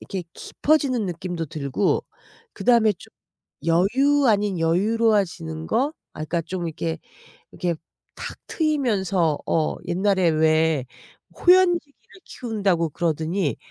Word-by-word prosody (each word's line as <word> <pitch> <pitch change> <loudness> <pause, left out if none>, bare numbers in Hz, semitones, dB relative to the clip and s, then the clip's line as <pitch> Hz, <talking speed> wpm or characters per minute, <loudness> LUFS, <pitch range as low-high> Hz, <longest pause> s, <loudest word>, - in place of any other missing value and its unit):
이렇게 190 -2 -5
깊어지는 270 -8 0
느낌도 175 -1 -4
들고 140 +5 -1 0.5
그다음에 230 -3 +3
좀 - - -16 0.6
여유 260 +12 +3
아닌 205 -3 +2
여유로워지는 180 -2 +1
거? 270 - +1 0.2
아 - - -10
그니까 165 +2 -1
좀 175 +1 -4
이렇게 85 - -3 0.5
이렇게 175 -2 -2 0.4
탁 - - -7
트이면서 200 - 0
어 160 -2 0
옛날에 190 -1 +2
왜 155 -2 +2 0.5
호연지기를 355 -2 +2
키운다고 200 -8 -1
그러더니 160 +1 -1
185 Hz, 270 characters per minute, -23 LUFS, 165-230 Hz, 0.6 s, 그다음에